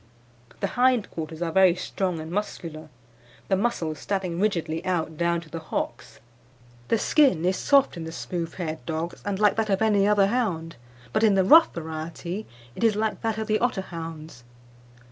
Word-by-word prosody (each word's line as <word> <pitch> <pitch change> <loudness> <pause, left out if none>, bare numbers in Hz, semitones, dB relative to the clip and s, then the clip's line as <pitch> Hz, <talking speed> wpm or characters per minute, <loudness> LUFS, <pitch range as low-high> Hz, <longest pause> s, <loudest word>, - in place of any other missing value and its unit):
"The - - +1 0.2
hind 250 -4 +3
quarters 160 +1 -5
are 165 - -2
very 185 0 +5
strong 180 -1 -2
and 160 +1 -7
muscular, 165 -5 -4 0.6
the 195 - +4
muscles 185 -8 -1
standing 185 -4 -2
rigidly 170 -5 0
out 165 -4 -1
down 170 +1 0
to 165 - -15
the 165 - -4
hocks. 160 - -5 0.7
"The 230 - +2
skin 220 - +3
is 185 +1 +2
soft 275 +1 +3
in 165 -2 -6
the 160 - -6
smooth 165 0 -5
haired 160 -3 -4
dogs, 165 +1 -4
and 200 -1 -1
like 210 0 +3
that 220 -1 0
of 195 -1 +2
any 205 -2 +3
other 205 -1 +4
hound, 195 -8 -1 0.4
but 215 - +2
in 210 -3 +5
the 190 - +4
rough 325 - +7
variety 170 +4 -6 0.3
it - - -5
is 225 -2 +4
like 215 0 -1
that 225 -1 -1
of 220 - -2
the 215 0 +1
Otterhound's. 165 - -4
185 Hz, 180 wpm, -25 LUFS, 165-210 Hz, 0.7 s, rough